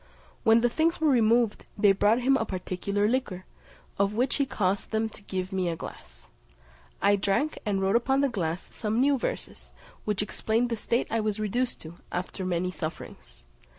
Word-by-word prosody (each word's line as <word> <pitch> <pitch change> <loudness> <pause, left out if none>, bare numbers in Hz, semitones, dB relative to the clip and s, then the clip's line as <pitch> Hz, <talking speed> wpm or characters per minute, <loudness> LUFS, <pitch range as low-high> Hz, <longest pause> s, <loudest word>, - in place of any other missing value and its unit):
When 225 +1 +5
the 240 - +4
things 325 +6 +1
were 315 -2 +3
removed, 230 -2 +3
they 205 -1 +5
brought 210 +5 +3
him 270 +2 +4
a 270 - +1
particular 200 +1 -1
liquor, 215 -7 -1 0.5
of 200 +1 +2
which 245 +2 +1
he 280 - +1
caused 195 -3 -1
them 220 0 0
to 215 - -15
give 190 -1 -4
me 185 -2 0
a 165 - -2
glass. - - -11 0.8
I 200 +1 +5
drank, 200 +10 0
and 200 -2 +1
wrote 195 +3 +2
upon 265 +3 +3
the 280 - +3
glass 180 -7 -3
some 220 +1 -1
new 275 +1 +3
verses, - - -5 0.3
which 210 -1 0
explained 225 +3 0
the 230 - 0
state 235 +2 0
I 230 - +1
was 215 -1 -1
reduced 240 +4 -1
to, 165 +2 -10
after 185 +2 -4
many 180 0 0
sufferings. 155 - -8
210 Hz, 185 wpm, -27 LUFS, 190-240 Hz, 0.8 s, When